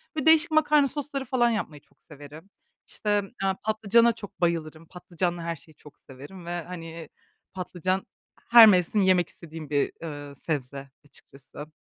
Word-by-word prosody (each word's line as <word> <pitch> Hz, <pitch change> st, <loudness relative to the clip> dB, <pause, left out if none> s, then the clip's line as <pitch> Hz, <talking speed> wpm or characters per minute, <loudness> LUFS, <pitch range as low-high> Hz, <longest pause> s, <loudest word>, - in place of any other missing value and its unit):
böyle, 305 Hz, -, -3 dB
değişik 320 Hz, +1 st, +5 dB
makarna 300 Hz, -2 st, +4 dB
sosları 280 Hz, -1 st, -5 dB
falan 240 Hz, -1 st, +2 dB
yapmayı 160 Hz, -, -4 dB
çok -, -, -33 dB
severim. 150 Hz, +4 st, -13 dB, 0.4 s
İşte, 205 Hz, -1 st, -1 dB, 0.2 s
eee, 190 Hz, 0 st, +1 dB
patlıcana 220 Hz, +2 st, +3 dB
çok 205 Hz, -4 st, -12 dB
bayılırım. 165 Hz, -2 st, -2 dB
Patlıcanla 175 Hz, -1 st, -4 dB
her 170 Hz, 0 st, -3 dB
şeyi 155 Hz, +1 st, -17 dB
çok 150 Hz, -, -18 dB
severim 145 Hz, +7 st, -13 dB
ve, 175 Hz, 0 st, -4 dB
hani, 165 Hz, -2 st, -9 dB, 0.4 s
patlıcan 185 Hz, +1 st, -3 dB, 0.4 s
her 235 Hz, -1 st, +10 dB
mevsim 190 Hz, +1 st, +3 dB
yemek 185 Hz, -2 st, +3 dB
istediğim 160 Hz, -3 st, -11 dB
bir, 145 Hz, -1 st, 0 dB
eee, 145 Hz, -3 st, -8 dB
sebze 140 Hz, -2 st, -5 dB, 0.2 s
açıkçası. 145 Hz, +1 st, -13 dB
175 Hz, 145 wpm, -26 LUFS, 155-215 Hz, 0.4 s, her